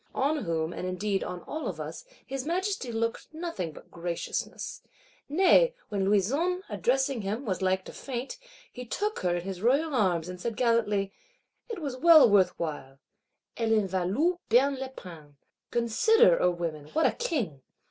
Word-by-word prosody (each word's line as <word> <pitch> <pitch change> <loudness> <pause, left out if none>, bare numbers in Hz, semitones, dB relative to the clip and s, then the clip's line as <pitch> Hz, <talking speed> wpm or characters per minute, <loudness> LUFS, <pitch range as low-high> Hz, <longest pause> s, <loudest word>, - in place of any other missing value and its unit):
On 285 -1 0
whom, 165 0 -1
and 180 - -4
indeed 195 +2 -1
on 180 -1 -5
all 310 +1 -5
of - - -5
us, - - -6 0.2
his 270 -1 -4
Majesty 360 -4 -2
looked 230 0 -2
nothing 315 - -4
but - - -15
graciousness. 170 0 -4 0.5
Nay, 385 - +5
when 200 -3 -1
Louison, 280 - +1
addressing 250 +5 0
him, 210 +7 -3
was 190 -3 -2
like 190 0 +1
to - - -9
faint, 265 - -5 0.3
he 250 - -7
took 415 - -2
her 175 -1 0
in 175 - -3
his 190 -1 -6
royal 280 +7 +2
arms; 180 -8 +1
and 180 0 -7
said 230 +1 -3
gallantly, 210 -5 +1 0.6
'It 455 - -4
was 280 -5 -4
well 325 0 +8
worth 200 -3 +3
while 145 -5 -5 0.6
(Elle 225 -1 +2
en 210 -3 +2
valût 200 - 0
bien 275 +4 +4
la 265 - -3
peine).' 165 - -12 0.3
Consider, 445 - +4
O - - +4
women, 165 -4 -4
what 320 - +2
a - - +5
King! 245 - -2
230 Hz, 170 wpm, -28 LUFS, 185-295 Hz, 0.6 s, well